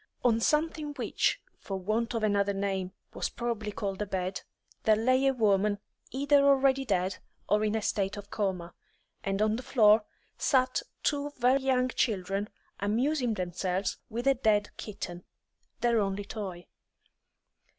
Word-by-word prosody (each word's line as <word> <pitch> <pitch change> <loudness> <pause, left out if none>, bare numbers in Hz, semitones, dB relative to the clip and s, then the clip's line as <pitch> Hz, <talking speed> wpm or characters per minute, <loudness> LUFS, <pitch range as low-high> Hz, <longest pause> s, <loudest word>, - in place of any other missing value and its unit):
On 230 -2 +4
something 300 +2 0
which, 255 - 0 0.2
for 195 - -4
want 215 +5 -1
of 225 - -1
another 200 -1 +2
name, 195 -2 -2 0.2
was - - -2
probably 230 -3 -3
called 200 -1 -4
a 210 - -1
bed, 185 0 -2 0.4
there 220 - +4
lay 255 +5 +3
a - - +5
woman 210 -4 +2 0.3
either 280 +1 +3
already 270 -1 +4
dead 190 -5 0 0.3
or 210 +1 +3
in 215 0 +1
a 220 - -1
state 195 0 -1
of 205 0 -9
coma, 185 -5 -2 0.5
and 195 +1 0
on 215 +1 +2
the - - -5
floor 220 -4 +5 0.4
sat 255 -2 +2 0.2
two 290 -1 0
very 255 +2 +3
young 255 -1 +2
children, 200 -3 -1 0.3
amusing 245 +4 +1
themselves 185 +1 -2
with 235 +3 -4
a 275 - +6
dead 215 -5 +1
kitten, 180 -4 -6 0.6
their 235 -1 +3
only 200 0 -1
toy. 195 -5 -6
215 Hz, 150 wpm, -29 LUFS, 195-255 Hz, 0.6 s, a